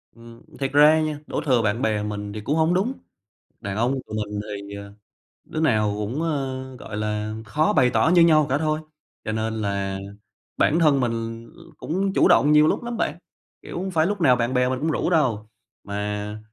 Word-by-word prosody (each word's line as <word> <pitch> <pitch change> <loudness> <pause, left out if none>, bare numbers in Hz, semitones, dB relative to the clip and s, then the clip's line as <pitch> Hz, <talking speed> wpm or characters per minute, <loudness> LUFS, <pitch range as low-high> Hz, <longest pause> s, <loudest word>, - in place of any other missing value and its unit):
Ừm, 115 0 -14 0.2
thiệt 135 -1 -1
ra 150 +2 +6
nha, 155 -1 -2
đổ - - -2
thừa 130 -5 +3
bạn 110 +2 0
bè 105 -4 0
mình 105 -1 -5
thì 105 - -6
cũng 140 +8 -1
hổng 160 +2 +2
đúng, 200 +8 0 0.7
đàn 95 -1 -5
ông 120 +4 +1
tụi 110 - -6
mình 105 -1 -3
thì, 100 -1 -7
ờ, 100 0 -9 0.5
đứa 155 - -5
nào 110 -9 +2
cũng, 110 +8 -3
ờ, 135 -5 -2 0.2
gọi 105 - -7
là, 105 0 -2
khó 150 +9 +1
bày 130 -4 +4
tỏ 145 +5 +2
như 175 - +6
nhau 155 -2 +5
cả 135 - +2
thôi, 155 0 0 0.5
cho 110 - -2
nên 110 +1 -2
là 100 -1 -2 0.6
bản 160 - +3
thân 150 -4 +4
mình 115 -1 -3
l - - -18 0.2
cũng 190 +4 -2
chủ - - +4
động 150 -5 +5
nhiều 150 0 +6
lúc - - 0
lắm 240 -1 -4
bạn. 155 -6 -1 0.4
Kiểu, - - -8
hông 190 +1 -3
phải 160 -3 +2
lúc 205 -1 -3
nào 130 -6 +5
bạn 120 +1 -1
bè 125 0 +2
mình 130 0 -2
cũng 160 +3 0
rủ 155 - -1
đâu, 120 - +1 0.3
mà 105 +1 -4
125 Hz, 210 wpm, -23 LUFS, 105-155 Hz, 0.7 s, ra